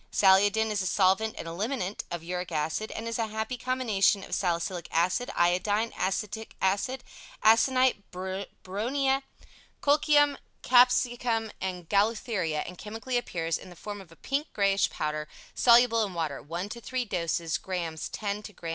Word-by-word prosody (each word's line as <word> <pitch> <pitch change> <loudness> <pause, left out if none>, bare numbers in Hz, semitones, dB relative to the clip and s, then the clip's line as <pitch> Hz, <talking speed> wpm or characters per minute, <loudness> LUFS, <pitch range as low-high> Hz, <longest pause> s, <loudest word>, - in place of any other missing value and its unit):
"Saliodin" 205 +3 +4
is 205 -2 0
a 190 - -1
solvent 195 +4 +2
and - - -6
eliminant 200 +3 -3
of 170 -1 -5
uric 180 +1 -4
acid 160 +7 -1
and 225 - -5
is 230 0 -3
a 225 - 0
happy 220 +3 -3
combination 230 -6 +1
of - - -8
Salicylic 175 -1 -1
Acid, 180 +9 +1
Iodine, 205 +6 +1
Acetic 210 +3 -3
Acid, 205 +7 0 0.4
Aconite, 255 +1 +4
Bryonia, 200 +8 -2 0.6
Colchicum, 290 -1 +4 0.2
Capsicum 245 -2 +3
and 180 -3 -4
Gaultheria 200 -6 +1
and 180 +1 -9
chemically 225 +4 -5
appears 165 -9 -1
in - - -12
the 175 - -12
form 205 +3 -7
of 180 -4 -16
a - - -14
pink 280 - -2
greyish 195 -1 +2
powder 150 0 -3 0.3
soluble 235 -1 +5
in 195 -4 -4
water 155 -4 -2
1 170 +6 -5
to 235 +2 -7
3 255 +1 -2
dose 170 -4 -1
grs. 170 -4 -4
X 205 -1 -3
to 210 0 -10
grs. 170 - -7
205 Hz, 155 wpm, -28 LUFS, 180-235 Hz, 0.6 s, soluble